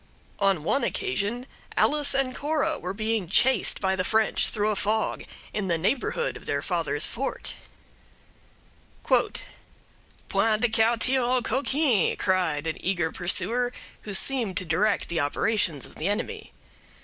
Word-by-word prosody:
On 195 -6 +2
one 275 - 0
occasion 245 - -2 0.3
Alice 290 -2 +3
and 270 -2 0
Cora 300 0 -1
were 180 - -4
being 215 -1 -2
chased 245 +6 +3
by 190 -1 0
the 185 - -1
French 220 +3 +2
through 210 0 0
a - - -1
fog 215 +2 -1 0.3
in 210 -2 -2
the 170 -2 +1
neighborhood 260 - -1
of - - -11
their - - -1
father's - - 0
fort: - - -3 1.5
"'Point - - +1 0.9
de 225 +2 +2
quartier 230 +4 +2
aux 250 0 +1
coquins!' 265 - +1
cried 180 -6 0
an 160 - -4
eager 175 -4 0
pursuer, 215 +7 +2 0.3
who 210 - -7
seemed 235 -3 +2
to 185 - -1
direct 200 +6 +1
the 170 -1 -2
operations 160 - 0
of - - -10
the 160 - -2
enemy. 425 - -3
215 Hz, 140 wpm, -26 LUFS, 185-250 Hz, 1.5 s, Alice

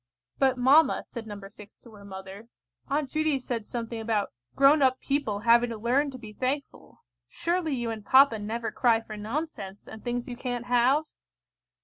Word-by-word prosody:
"But, 265 -2 +3
mamma," 275 +6 +4
said 230 -2 -8
No. 205 -1 -7
6 205 0 -15
to 235 - -17
her 205 -1 -13
mother, 190 +2 -9 0.4
"Aunt 280 -1 -1
Judy 310 -2 +1
said 240 -4 -4
something 230 -1 -4
about 220 -2 -1 0.2
grown 280 +2 +5
up 260 -1 +3
people 275 -8 -1
having 235 +1 +4
to 230 - -5
learn 255 +6 +1
to 260 - -8
be 220 -4 -11
thankful. 265 +5 -4 0.3
Surely 335 - -1
you 240 -2 -2
and 220 -2 -6
papa 260 0 +5
never 225 +2 -3
cry 235 -3 +3
for 225 -1 -9
nonsense, 210 -3 -5
and 220 - -10
things 240 0 -3
you 245 - -5
can't 245 -1 -4
have?" 250 +5 +3
240 Hz, 175 wpm, -27 LUFS, 220-270 Hz, 0.4 s, grown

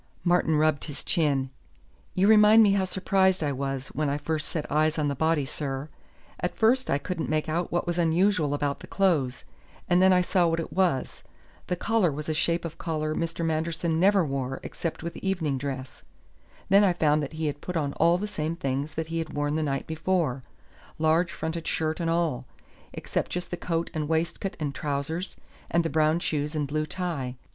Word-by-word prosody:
Martin 175 -3 +3
rubbed 155 -1 +2
his 150 -3 -8
chin. 140 -6 +1 0.6
"You 190 +1 +3
remind 215 +1 +7
me 205 - +5
how 195 -1 +2
surprised 190 -1 +2
I 145 - 0
was 135 0 -3
when 150 -1 -1
I 140 - 0
first 155 0 -3
set 155 - -4
eyes 155 +2 +2
on 150 -2 +1
the 140 - -2
body, 160 0 +1
sir. 140 0 -4 0.5
At - - -2
first 250 +4 +3
I 140 - +3
couldn't 165 +3 -4
make 155 0 0
out 165 +3 -1
what 175 - 0
was 175 0 -1
unusual 165 -2 +2
about 145 -1 -1
the - - -11
clothes, 150 - +1 0.4
and 175 +1 +4
then 190 0 +6
I 180 -1 +5
saw 180 -1 +2
what 165 0 0
it 165 - -5
was. 180 -9 0 0.5
The 180 - 0
collar 210 -2 +1
was 150 +2 -6
a 155 - 0
shape 170 +2 0
of 160 - -7
collar 155 -2 -2
Mr. 165 +1 -2
Manderson 160 +1 -1
never 195 0 +4
wore 135 -2 -3
except 165 -1 -5
with 170 0 -5
evening 165 -8 -1
dress. 135 -2 -5 0.7
Then 200 +2 +6
I 190 -3 +4
found 155 -3 +2
that 145 +2 -5
he 160 0 -3
had 145 -1 -3
put 180 -2 -3
on 145 -3 -1
all 170 +1 +3
the 200 - -3
same 160 -5 -3
things 140 -1 -3
that 160 - -2
he 165 0 -2
had 160 - -4
worn 145 0 -1
the 160 - 0
night 135 -3 -1
before 160 -4 -1 0.6
large 160 +3 +2
fronted 160 0 -4
shirt 160 +1 -1
and 165 -1 0
all 160 -7 0 0.4
except - - -3
just 180 0 -4
the - - -1
coat 170 -1 -2
and 155 -2 -2
waistcoat 170 +5 -1
and 145 -3 -2
trousers, 145 +6 -3 0.3
and 170 0 +2
the 165 - -1
brown 155 +1 +3
shoes 150 -2 -2
and 150 -2 -1
blue 155 +2 -1
tie. 155 -10 -3
160 Hz, 205 wpm, -27 LUFS, 145-175 Hz, 0.7 s, remind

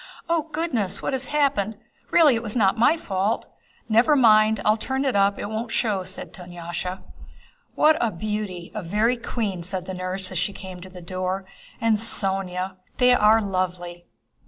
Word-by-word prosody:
"Oh 330 -2 0
goodness! 245 - -1
What - - -1
has 265 0 0
happened? 270 -9 0 0.3
Really 310 -5 +6
it 230 - -1
was 215 -1 -5
not 195 -5 +3
my 240 +8 +4
fault!" 200 -4 -1 0.4
"Never 230 +7 +4
mind, 215 -4 +5
I'll 215 +1 +3
run 265 +1 0
it 265 - 0
up, 200 0 +3
it - - -4
won't 220 +3 -4
show," 210 -5 0
said 185 - -7
Dunyásha. 175 +1 -6 0.7
"What 310 +1 +5
a 230 - +2
beauty—a 210 -1 -4
very 210 +7 +1
queen!" 210 -6 -3
said 185 +1 -4
the 190 - -5
nurse 185 +1 -4
as 185 - -2
she 200 - -1
came 185 -2 -9
to 185 - -10
the 180 -1 -11
door. 185 +2 -3 0.3
"And 225 -1 +2
Sónya! 190 -3 -1 0.2
They 250 -1 +5
are 220 -1 +5
lovely!" 180 -2 -3
205 Hz, 170 wpm, -24 LUFS, 185-230 Hz, 0.7 s, Really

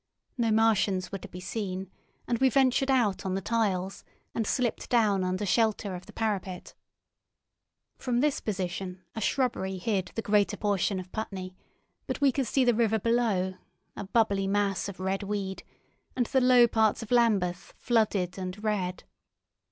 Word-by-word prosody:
No 235 -3 +1
Martians 210 -4 +2
were 195 - -4
to - - -9
be 180 - -9
seen, 190 -1 -4 0.4
and 235 -2 0
we 265 - +5
ventured 265 +1 +3
out 235 -8 +2
on 190 -1 -2
the - - 0
tiles, 195 -3 -1 0.3
and 225 -3 -1
slipped 245 -3 -1
down 210 -5 +3
under 185 +2 -1
shelter 215 -1 +1
of 180 0 -8
the - - -11
parapet. 195 -5 -3 1.3
From 245 -2 0
this 290 +1 +1
position 185 -2 -4
a 220 - -5
shrubbery 210 -6 0
hid 190 0 -1
the 225 - -2
greater 205 -1 +2
portion 200 -2 0
of 185 0 -9
Putney, 190 -4 -5 0.5
but - - -3
we 280 -2 +4
could 265 -1 -1
see 260 +2 +2
the 245 - +4
river 220 -1 +2
below, 220 -5 +1 0.4
a - - -5
bubbly 200 -2 +1
mass 200 -1 0
of 190 - -9
red 190 +1 -1
weed, 200 -1 -3 0.5
and 250 -1 +1
the 265 +2 +1
low 250 -1 +6
parts 220 0 +2
of 225 - -11
Lambeth 200 -7 +1
flooded 200 -6 +1
and 185 +3 -6
red. 190 -4 -1
205 Hz, 165 wpm, -28 LUFS, 190-230 Hz, 1.3 s, low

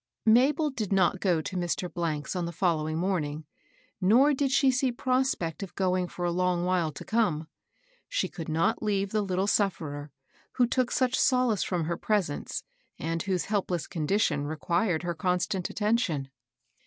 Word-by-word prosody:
Mabel 275 +7 +4
did 220 -7 -4
not 190 -1 +3
go 180 -5 +2
to 185 - -5
Mr. 170 -3 -2
's - - -4
on 180 -1 -1
the 170 - -4
follow 165 -3 0
ing 155 - -2
morning, 160 -4 -1 0.6
nor 245 +10 +5
did 275 0 +1
she 275 0 +4
see 255 0 +1
prospect 255 - 0
of 195 - -7
going 185 -1 +1
for 175 0 -5
a 175 - +1
long 180 0 +1
while 180 -3 +1
to - - -9
come. 190 -9 0 0.6
She - - 0
could 165 -3 -7
not 165 +9 +1
leave 200 -2 0
the 215 -1 +1
Kt - - -6
tle 190 +2 +1
sufferer, 155 -8 -1 0.4
who 250 - +3
took 250 0 0
such 255 -1 +1
solace 250 -6 +3
from 175 -3 -1
her 170 +2 -2
pres 205 -8 +1
ence, - - -5 0.3
and 165 +1 -2
whose 185 -3 -1
helpless 185 -5 -1
condition 155 -3 0
required 170 +3 0
her 175 0 -1
constant 180 +2 -1
attention. 205 - 0
185 Hz, 175 wpm, -28 LUFS, 165-220 Hz, 0.6 s, nor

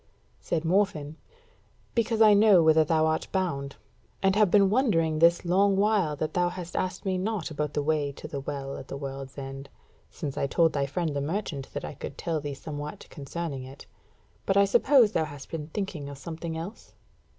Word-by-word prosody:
Said 165 -1 -2
Morfinn: 165 -5 +1 0.8
"Because 230 -1 +2
I 215 -1 +7
know 205 -4 +6
whither 160 0 +5
thou 155 0 +2
art 160 0 0
bound, 140 -8 -2 0.5
and 195 0 +3
have 210 -2 +4
been 195 0 +5
wondering 165 - +2
this 170 +2 +4
long 195 +3 +3
while 200 -7 +2
that 155 +1 -3
thou 175 -1 +2
hast 175 -1 -8
asked 185 +1 -2
me 185 -1 0
not 195 -4 -2
about 150 -1 -3
the 145 - 0
way 150 -2 0
to - - -9
the 140 - -5
WELL 135 0 -5
at - - -9
the 135 - -6
WORLD'S 135 -1 -7
END: 135 0 -7 0.4
since 140 -3 -6
I 140 - +1
told 165 +3 +3
thy 140 -1 0
friend 155 +1 -2
the 140 - -1
merchant 150 -3 -3
that - - -3
I - - -6
could 140 0 -8
tell 165 -2 -2
thee 145 -1 -5
somewhat 145 +1 -7
concerning 145 -1 -5
it. 135 +2 -11 0.6
But 195 - +2
I 200 - +6
suppose 235 +2 +5
thou 160 - +1
hast 145 -2 -10
been 155 -3 -4
thinking 165 -5 -4
of 140 - -8
something 160 +3 -6
else?" 175 +7 -8
160 Hz, 195 wpm, -27 LUFS, 145-190 Hz, 0.8 s, I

